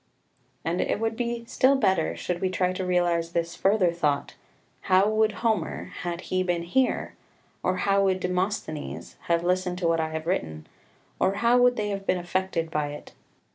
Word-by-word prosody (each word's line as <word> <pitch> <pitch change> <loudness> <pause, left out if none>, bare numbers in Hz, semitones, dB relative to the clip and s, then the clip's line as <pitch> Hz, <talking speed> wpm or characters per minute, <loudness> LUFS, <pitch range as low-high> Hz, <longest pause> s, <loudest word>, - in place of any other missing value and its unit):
2 165 - 0
And 175 - 0
it - - 0
would 225 0 -1
be 235 0 -3
still 260 +3 +3
better 190 -11 +1
should 175 -1 -3
we 190 - +1
try 185 0 0
to 185 - -3
realise 175 -2 +1
this 170 0 -1
further 195 -3 +3
thought, 150 -4 -1 0.6
How 185 +2 +5
would 215 0 +2
Homer, 220 -2 -1
had 175 0 -3
he 185 0 -1
been 175 -2 0
here, 250 +10 0 0.5
or 185 0 0
how 195 0 +3
would 190 -1 +2
Demosthenes, 180 -4 -3
have 170 0 +2
listened 180 0 0
to 180 -2 0
what 165 0 +2
I 160 0 0
have 160 0 -5
written, 80 - -2 0.5
or 190 +1 +2
how 235 +4 +4
would 245 0 +5
they 210 -2 -2
have 195 -1 -4
been 185 - +2
affected 175 -2 -2
by 150 -2 0
it? 145 - -10
185 Hz, 185 wpm, -26 LUFS, 170-205 Hz, 0.6 s, How